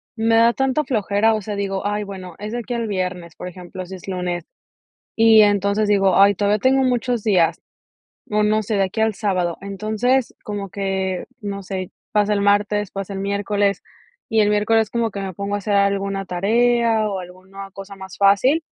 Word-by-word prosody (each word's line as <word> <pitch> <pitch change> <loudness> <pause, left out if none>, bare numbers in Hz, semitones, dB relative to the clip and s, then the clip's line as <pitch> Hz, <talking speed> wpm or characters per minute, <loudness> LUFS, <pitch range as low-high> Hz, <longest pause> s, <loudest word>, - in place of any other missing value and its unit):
me 225 0 +2
da 230 +1 +5
tanta 270 +3 0
flojera, 220 -3 +1
o 215 - -3
sea, 210 +1 -4
digo: 195 -1 -3
"Ay, 205 +1 -1
bueno, 190 -3 -8
es 210 +1 -5
de 240 - -2
aquí 240 +1 -5
al 230 -1 -2
viernes", 180 -4 -4
por - - -7
ejemplo, 180 +1 -8
si 185 - -10
es 185 - -13
lunes. 180 -2 -3 0.7
Y, 225 -1 +7
entonces, 205 +1 +2
digo: 195 -3 +3
"Ay, 200 +1 +6
todavía 205 +2 +1
tengo 260 +4 +3
muchos 245 -2 0
días". 170 -6 +2 0.7
No, 210 0 +1
no 215 +1 +2
sé, 215 +1 -3
de 195 - +3
aquí 190 +4 -4
al 220 -1 +2
sábado. 185 -5 -1
Entonces, 215 +6 0
como 205 -1 -5
que, 190 -1 -2 0.2
no 200 -2 -5
sé, 185 -1 -5 0.2
pasa 210 0 +2
el 200 - 0
martes, 205 0 +1
pasa 195 0 -5
el - - -4
miércoles, 200 0 0 0.5
y 220 -1 +3
el 210 -1 +3
miércoles 210 +1 +2
como 235 -1 0
que 200 - -6
me 195 -1 -4
pongo 200 +3 -4
a - - 0
hacer 205 +1 -3
alguna 200 0 0
tarea, 225 +4 +2
o, 195 -2 -3
alguna 190 +2 -10
cosa 195 +1 -10
más 190 -1 -10
fácil. 205 - +4
200 Hz, 195 wpm, -21 LUFS, 195-220 Hz, 0.7 s, Y